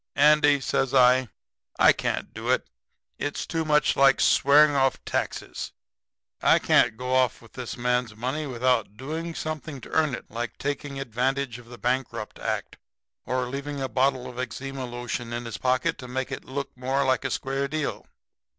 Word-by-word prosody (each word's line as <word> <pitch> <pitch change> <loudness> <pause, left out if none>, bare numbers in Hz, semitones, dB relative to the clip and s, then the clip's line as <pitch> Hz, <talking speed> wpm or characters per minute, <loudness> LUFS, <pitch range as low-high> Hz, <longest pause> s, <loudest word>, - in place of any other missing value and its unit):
"'Andy,' 145 0 +5
says 135 0 0
I, 130 0 +5 0.5
'I - - +7
can't - - -3
do - - -5
it. - - +2 0.5
It's 145 - -3
too 165 -1 -2
much 150 -1 +3
like 135 -1 +5
swearing 145 +1 +5
off 135 -1 +1
taxes. - - -3 0.7
I - - +5
can't 115 -2 +3
go 125 +1 -3
off 130 -1 +2
with 115 - -18
this 125 -2 -6
man's 125 -2 0
money 130 +7 -3
without 120 -4 0
doing 160 +6 -5
something 155 -2 -5
to - - -11
earn 155 -5 +2
it - - -10
like 120 +2 -4
taking 140 -1 -3
advantage 130 0 -1
of 120 - -15
the 120 - -10
Bankrupt 130 +2 -2
act - - -3 0.5
or 130 0 0
leaving 140 +3 -5
a 135 - -1
bottle 130 -1 +1
of 125 - -8
eczema 135 +1 -4
lotion 120 -1 -5
in 120 0 -4
his 115 -3 -6
pocket 130 0 +1
to 125 - -8
make 130 +1 -3
it - - -5
look 140 +2 -5
more 135 +2 0
like 130 -2 +2
a 135 - -1
square 135 +2 -1
deal.' 155 0 -3
130 Hz, 175 wpm, -26 LUFS, 125-140 Hz, 0.7 s, I